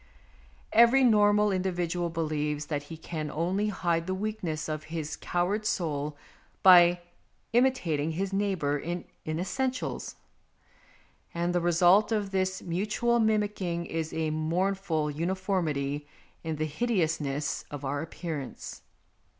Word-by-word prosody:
Every 235 +4 +6
normal 210 -3 +5
individual 180 -2 -1
believes 150 -2 -2
that 145 - 0
he 165 - -7
can 155 -1 -5
only 180 +7 0
hide 170 -4 0
the 185 - -1
weakness 190 -7 -3
of 155 -1 -4
his 160 -2 -4
coward 185 +5 -1
soul 150 -7 -2 0.5
by 175 -1 +8 0.5
imitating 175 - +2
his 195 +3 -2
neighbour 185 -8 0
in 175 +4 -4 0.2
inessentials; 250 +11 -2 1.2
and 175 +1 0
the 175 - +1
result 175 +5 +4
of 205 -3 0
this 190 -1 -1
mutual 210 +7 0
mimicking 205 -6 0
is 160 -1 -3
a 160 -1 -1
mournful 165 0 0
uniformity 155 -4 -1 0.4
in 160 -1 -2
the 155 +1 -1
hideousness 155 - -1
of 145 -1 -6
our 140 +1 -1
appearance. 160 -3 -6
175 Hz, 120 wpm, -28 LUFS, 155-195 Hz, 1.2 s, by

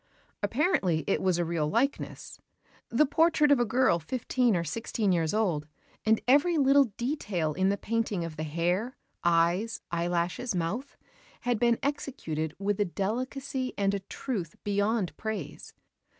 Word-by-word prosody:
Apparently 205 - +1
it - - +1
was 185 -2 +2
a 175 - 0
real 165 -2 0
likeness, 260 - -2 0.5
the 250 +6 +4
portrait 310 0 +3
of 280 - +5
a 240 - +3
girl 235 -6 +3
fifteen 245 - 0
or 170 - 0
sixteen 210 +4 -1
years 165 -3 +1
old; 180 -9 0 0.4
and 220 0 +5
every 295 +6 +4
little 280 0 +5
detail 210 - -1
in 190 +4 +2
the 200 - +1
painting 215 -5 -1
of 165 -2 -7
the 155 - -5
hair, 175 - -1 0.3
eyes, 175 +6 +2
eyelashes, 175 +6 -1
mouth, 200 +11 -3 0.4
had 245 -3 0
been 235 0 +3
executed 165 - -3
with 200 +1 -1
a 205 - +3
delicacy 255 - -3
and 200 0 +1
a 200 - -1
truth 195 - -5
beyond 205 -1 0
praise. 210 -9 -5
205 Hz, 150 wpm, -29 LUFS, 170-250 Hz, 0.5 s, of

